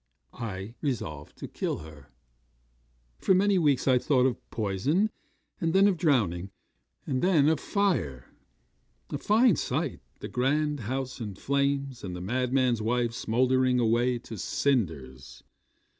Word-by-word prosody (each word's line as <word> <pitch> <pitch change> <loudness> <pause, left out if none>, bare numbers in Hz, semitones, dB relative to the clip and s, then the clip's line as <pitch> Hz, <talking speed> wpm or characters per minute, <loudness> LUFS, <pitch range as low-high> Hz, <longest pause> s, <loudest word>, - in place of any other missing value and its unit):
I 105 -2 -6
resolved 80 - -4
to - - -7
kill - - -3
her. 75 -3 -12 1.1
'For 190 - +3
many 195 0 +3
weeks 145 -6 +2
I 130 -1 +5
thought 130 -1 +2
of 130 - -2
poison, 120 - 0 0.5
and 165 -4 0
then 195 +1 +6
of 200 - +2
drowning, 100 - +1 0.6
and 130 -2 -1
then 165 -6 +4
of 160 -2 +3
fire. 155 - -1 0.9
A 145 - -3
fine 220 - +4
sight, - - -2 0.2
the - - -6
grand 145 +3 0
house 130 +3 -4
in 105 -4 -5
flames, 140 +1 -1
and 90 -2 -5
the - - -6
madman's 125 +3 +1
wife 120 +1 0
smouldering 125 +2 +2
away 120 +2 +2
to 115 -3 -9
cinders. 80 - -2
125 Hz, 135 wpm, -28 LUFS, 105-145 Hz, 1.1 s, then